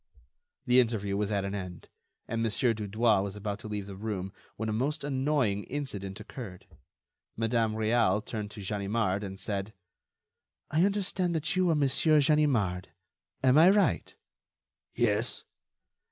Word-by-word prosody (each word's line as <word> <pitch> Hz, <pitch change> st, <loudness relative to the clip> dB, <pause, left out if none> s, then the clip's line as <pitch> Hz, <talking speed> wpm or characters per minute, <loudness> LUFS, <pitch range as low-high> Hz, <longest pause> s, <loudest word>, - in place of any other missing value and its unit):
The 125 Hz, -1 st, +5 dB
interview 110 Hz, -5 st, +1 dB
was 100 Hz, 0 st, 0 dB
at 100 Hz, -2 st, 0 dB
an 100 Hz, -, -3 dB
end, 90 Hz, -4 st, -6 dB, 0.4 s
and 115 Hz, 0 st, -2 dB
Mon. 115 Hz, -, +1 dB
Dudouis 110 Hz, -2 st, +2 dB
was 100 Hz, 0 st, -4 dB
about 105 Hz, 0 st, -4 dB
to 115 Hz, -, -8 dB
leave 105 Hz, -2 st, -4 dB
the 100 Hz, -1 st, -8 dB
room 95 Hz, -2 st, -4 dB, 0.2 s
when 110 Hz, -, -3 dB
a 110 Hz, -, -1 dB
most 140 Hz, +8 st, -1 dB
annoying 135 Hz, -7 st, 0 dB
incident 105 Hz, -9 st, -5 dB
occurred. 105 Hz, -4 st, -9 dB, 0.7 s
Madame 115 Hz, -1 st, +1 dB
Réal 110 Hz, -2 st, +2 dB
turned 105 Hz, -3 st, -4 dB
to 105 Hz, 0 st, -9 dB
Ganimard, 100 Hz, 0 st, -1 dB
and 95 Hz, -1 st, -6 dB
said: 100 Hz, +1 st, -3 dB, 1.0 s
"I 160 Hz, +4 st, +4 dB
understand 190 Hz, -3 st, 0 dB
that 155 Hz, 0 st, -1 dB
you 185 Hz, -1 st, +3 dB
are 165 Hz, -, +3 dB
Monsieur 150 Hz, +2 st, +3 dB
Ganimard. 135 Hz, -, +2 dB, 0.6 s
Am 130 Hz, +3 st, +6 dB
I 170 Hz, +3 st, +8 dB
right?" 205 Hz, +1 st, +2 dB, 0.8 s
"Yes." -, -, 0 dB
110 Hz, 145 wpm, -29 LUFS, 100-140 Hz, 1.0 s, I